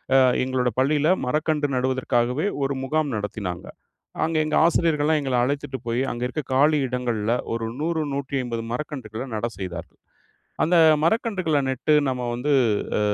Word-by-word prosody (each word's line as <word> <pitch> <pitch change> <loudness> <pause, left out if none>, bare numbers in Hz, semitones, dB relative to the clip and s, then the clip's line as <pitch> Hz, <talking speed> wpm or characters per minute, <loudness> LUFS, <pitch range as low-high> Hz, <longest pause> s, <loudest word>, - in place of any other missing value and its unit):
அ - - +8 0.3
எங்களோட 130 -1 0
பள்ளியில 150 +3 +2 0.2
மரக்கன்று 150 +1 0
நடுவதற்காகவே 130 +3 0 0.2
ஒரு 140 +1 0
முகாம் 150 -1 0
நடத்தினாங்க. 105 -4 -5 0.6
அங்கே 160 -1 0
எங்க 155 - -1
ஆசிரியர்கள்லாம் 160 -2 +2
எங்கள 135 -2 -1
அழைத்துட்டு 140 0 -2
போயி, 115 +2 0
அங்க 120 +1 -4
இருக்க 155 +4 -4
காலி 150 +3 +4
இடங்கள்ல 120 -3 -1 0.2
ஒரு 115 - -3 0.2
100, 160 0 0
150 130 -4 -3
மரக்கன்றுகள 125 -5 -5
நட 110 +2 -1
செய்தார்கள். 90 -3 -7 0.6
அந்த 170 +3 +3 0.3
மரக்கன்றுகள 185 -5 +1
நட்டு 130 +4 +1
நம்ம 125 -1 -2
வந்து, 140 +5 -1 0.5
அ - - 0
135 Hz, 135 wpm, -24 LUFS, 120-155 Hz, 0.6 s, அ